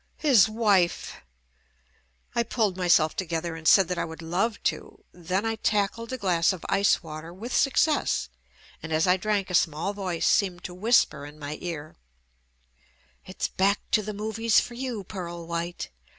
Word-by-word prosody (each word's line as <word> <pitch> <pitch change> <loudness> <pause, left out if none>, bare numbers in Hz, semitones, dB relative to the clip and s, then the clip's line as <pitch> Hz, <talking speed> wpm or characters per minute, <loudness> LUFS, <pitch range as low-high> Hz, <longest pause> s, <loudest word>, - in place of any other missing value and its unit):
His 255 -9 +5
wife! 205 -6 +1 1.2
I 235 - +2
pulled 220 -4 0
myself 175 -4 +3
together 170 -2 -3
and 160 -1 -5
said 195 -3 +6
that 180 0 -2
I - - 0
would 160 0 -9
love 195 +7 -1
to; - - -3
then 180 +4 -2
I 225 0 -1
tackled 215 +2 -1
a 260 - -3
glass 180 -6 +2
of 185 -3 -7
ice 200 -1 +2
water 160 +1 -8
with 215 +8 -6
success, 295 +2 +2 0.5
and 165 - -7
as 155 +1 +2
I 180 0 +4
drank 195 0 -1
a - - -5
small 165 +3 +1
voice 185 -4 -3
seemed 185 -3 +2
to 180 - -6
whisper 210 -6 +2
in 150 +1 -13
my 145 0 -6
ear, 160 -3 -6 1.3
"It's - - -3
back 200 +2 +1
to 215 - +4
the 215 +1 -5
movies 220 +2 +1
for 240 - -5
you, 240 -4 -4
Pearl 175 -3 -7
White. 170 - -4
185 Hz, 165 wpm, -26 LUFS, 170-215 Hz, 1.3 s, said